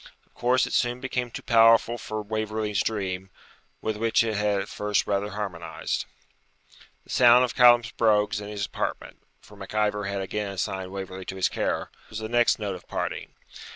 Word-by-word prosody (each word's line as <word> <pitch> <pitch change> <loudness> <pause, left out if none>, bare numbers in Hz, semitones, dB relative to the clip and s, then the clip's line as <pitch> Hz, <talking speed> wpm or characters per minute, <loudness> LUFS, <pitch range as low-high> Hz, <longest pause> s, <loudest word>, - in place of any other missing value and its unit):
Of - - -36
course 125 +1 +2
it - - -6
soon 120 0 +1
became 125 -2 -3
too - - -8
powerful 115 0 +5
for 110 0 -5
Waverley's 110 -1 -2
dream, 95 -3 -3 0.5
with 110 -1 -2
which 115 +1 +2
it 110 -1 -1
had 105 -1 +1
at 95 - -4
first 105 0 -1
rather 100 0 -1
harmonised. 100 -5 -4 1.0
The - - -13
sound 125 0 +6
of 125 - -5
Callum's 120 -1 +6
brogues 105 -2 +2
in 100 - -7
his 100 -1 -3
apartment - - -4 0.2
(for 105 - -16
Mac 100 +1 -9
Ivor 105 -1 +1
had 100 0 -2
again 100 +1 -3
assigned 95 0 -3
Waverley 95 -1 -6
to 95 - -6
his 95 - +1
care) - - -2 0.2
was 110 - -7
the 110 0 -4
next 120 0 +3
note 105 -3 -3
of 90 - -11
parting. - - -4
105 Hz, 185 wpm, -26 LUFS, 100-115 Hz, 1.0 s, sound